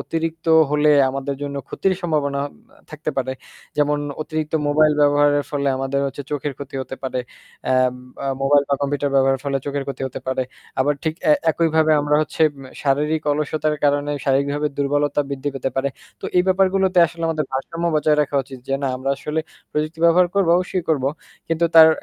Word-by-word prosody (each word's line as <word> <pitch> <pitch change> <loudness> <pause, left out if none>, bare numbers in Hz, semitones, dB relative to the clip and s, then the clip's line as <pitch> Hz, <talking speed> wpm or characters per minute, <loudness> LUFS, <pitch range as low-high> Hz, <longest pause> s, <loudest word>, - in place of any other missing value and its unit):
অতিরিক্ত 165 0 -3 0.3
হলে 150 0 +3 0.2
আমাদের 135 +1 -3
জন্য 140 0 -4
ক্ষতির 190 -1 0
সম্ভাবনা 145 -4 0 0.5
থাকতে 155 0 -4
পারে 130 -1 -1 0.4
যেমন 150 0 +2 0.2
অতিরিক্ত 155 0 -4 0.2
মোবাইল 155 +1 +4
ব্যবহারের 145 0 +4
ফলে 140 -1 0
আমাদের 135 +1 -1
হচ্ছে 140 +1 -5
চোখের 145 0 -2
ক্ষতি 140 0 -9
হতে 130 - -7
পারে। 130 -1 -2 0.5
এ্যাম 130 -1 +2 0.3
আ - - -2 0.2
মোবাইল 140 +1 +4
বা 140 - +3
কম্পিউটার 145 0 -1
ব্যবহারের 135 -1 +3
ফলে 140 -1 0
চোখের 140 -1 -2
ক্ষতি 140 - -5
হতে - - -8
পারে 130 0 0 0.4
আবার 145 +3 +2
ঠিক 160 -1 0
এ্যা 150 - +7 0.2
একইভাবে 160 -1 +2
আমরা 145 0 +1
হচ্ছে 155 +1 -2
উম 135 - -11 0.2
শারীরিক 150 +3 +1
অলসতার 150 +1 -1
কারণে 145 0 +2
শারীরিকভাবে 140 +2 +1
দুর্বলতা 145 +1 +1
বৃদ্ধি 140 +1 -3
পেতে 135 0 -2
পারে। 135 +1 +1 0.3
তো - - -10
এই 180 - +6
ব্যাপারগুলোতে 190 0 +2
আসলে 165 +1 -9
আমাদের 155 -2 0
ভারসাম্য 165 +6 -3
বজায় 150 0 +3
রাখা 145 - -6
উচিত। 130 0 -11
যে - - -1
না - - +1
আমরা 130 +2 -2
আসলে 150 +3 -2 0.3
প্রযুক্তি 155 +2 -2
ব্যবহার 175 +2 +5
করব 200 -4 +2
অবশ্যই 180 0 -1
করবো। 140 -4 +2 0.4
কিন্তু 165 +1 +2
তার 160 0 +10
145 Hz, 175 wpm, -21 LUFS, 140-155 Hz, 0.5 s, তার